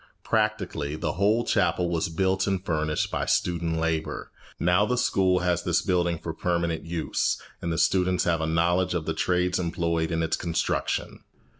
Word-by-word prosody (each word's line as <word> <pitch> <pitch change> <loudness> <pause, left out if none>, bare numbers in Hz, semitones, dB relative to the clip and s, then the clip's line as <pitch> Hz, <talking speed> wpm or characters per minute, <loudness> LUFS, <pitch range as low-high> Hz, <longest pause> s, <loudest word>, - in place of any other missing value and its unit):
Practically, 75 0 -1
the - - -2
whole 105 +5 +2
chapel 90 -5 +1
was 85 -1 -1
built 95 +3 0
and 95 -1 -1
furnished 75 -2 -1
by - - -2
student 85 -2 0
labour. 80 -1 -2 0.3
Now 90 +3 +3
the 125 +3 0
school 95 -5 +2
has 90 -1 +1
this 90 -1 +1
building 85 -2 +1
for 80 0 -5
permanent 85 -1 -1
use, 85 -1 -1 0.2
and 85 - -2
the 80 - -1
students 90 +1 +2
have 85 -2 +1
a 80 - 0
knowledge 85 +3 +1
of 80 -3 -2
the 80 - -1
trades 90 +1 +1
employed 85 -2 -1
in 80 0 0
its 80 0 0
construction. 85 -2 -2
85 Hz, 170 wpm, -26 LUFS, 80-90 Hz, 0.3 s, Now